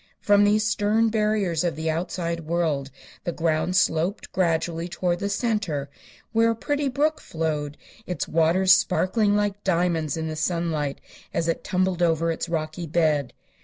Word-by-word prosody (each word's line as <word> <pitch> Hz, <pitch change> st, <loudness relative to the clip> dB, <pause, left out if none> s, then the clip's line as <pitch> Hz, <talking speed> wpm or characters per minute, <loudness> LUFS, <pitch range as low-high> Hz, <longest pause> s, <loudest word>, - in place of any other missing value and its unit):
From 205 Hz, 0 st, +4 dB
these 210 Hz, +1 st, +3 dB
stern 215 Hz, +1 st, +2 dB
barriers 210 Hz, -6 st, +1 dB
of 175 Hz, -2 st, -1 dB
the 160 Hz, 0 st, -1 dB
outside 170 Hz, 0 st, -2 dB
world 160 Hz, -4 st, -1 dB, 0.3 s
the 175 Hz, -, -2 dB
ground 165 Hz, +1 st, 0 dB
sloped 175 Hz, +2 st, +1 dB
gradually 170 Hz, -1 st, 0 dB
toward 175 Hz, 0 st, -1 dB
the 200 Hz, -, -2 dB
center, 200 Hz, -, -1 dB, 0.4 s
where 230 Hz, 0 st, +3 dB
a 230 Hz, -, +1 dB
pretty 285 Hz, +4 st, -1 dB
brook 300 Hz, +4 st, 0 dB
flowed, 150 Hz, -3 st, -3 dB, 0.3 s
its 180 Hz, -4 st, -3 dB
waters 170 Hz, +4 st, +3 dB
sparkling 205 Hz, +3 st, +2 dB
like 205 Hz, 0 st, -1 dB
diamonds 170 Hz, -4 st, 0 dB
in 160 Hz, 0 st, -3 dB
the 155 Hz, -, -4 dB
sunlight 160 Hz, -3 st, -1 dB, 0.4 s
as 165 Hz, 0 st, 0 dB
it 165 Hz, -, -1 dB
tumbled 185 Hz, -1 st, 0 dB
over 165 Hz, -1 st, +2 dB
its 165 Hz, -, -4 dB
rocky 160 Hz, +1 st, -3 dB
bed. 150 Hz, -4 st, +1 dB
170 Hz, 155 wpm, -24 LUFS, 160-205 Hz, 0.4 s, From